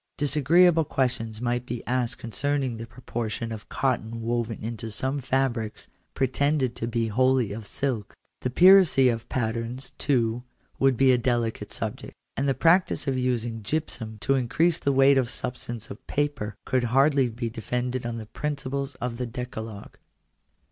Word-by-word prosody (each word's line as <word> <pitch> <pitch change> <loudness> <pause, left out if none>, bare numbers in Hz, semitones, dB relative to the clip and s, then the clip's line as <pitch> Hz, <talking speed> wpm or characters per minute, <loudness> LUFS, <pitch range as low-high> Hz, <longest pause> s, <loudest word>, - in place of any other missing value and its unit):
Disagreeable 160 +4 +4
questions 115 -5 -1
might 120 0 0
be 120 -1 -6
asked 125 -2 0
concerning 135 +1 -1
the 115 +1 -7
proportion 115 -2 -4
of 110 0 -8
cotton 115 -4 -1
woven 115 -1 -1
into 115 +1 -5
some 130 +7 -2
fabrics, 125 -4 -1 0.3
pretended 135 -1 +1
to 115 - -3
be 115 -1 -1
wholly 130 -1 +2
of 105 0 -7
silk. 125 -7 -3 0.2
The 125 - -2
piracy 175 -4 +7
of 115 -2 -3
patterns, 120 +1 -3
too, 120 -4 +1 0.4
would 135 -2 +3
be 135 +1 +5
a 125 - +3
delicate 120 -2 -1
subject. - - -5 0.2
And 135 +1 0
the 135 - +1
practice 170 +7 +3
of 135 -2 0
using 120 -3 -1
gypsum 115 -3 -3
to 135 - +2
increase 135 +6 +2
the 140 - +1
weight 135 0 +5
and 125 -3 0
substance 120 -1 -4
of - - -11
paper, 145 -8 -1
could 130 -1 +1
hardly 135 +1 +3
be 115 0 -4
defended 125 +3 -2
on 120 -1 -3
the 110 - -6
principles 140 +2 -3
of 120 -1 -4
the 125 0 -3
Decalogue. 115 -3 -7
125 Hz, 155 wpm, -26 LUFS, 115-135 Hz, 0.4 s, piracy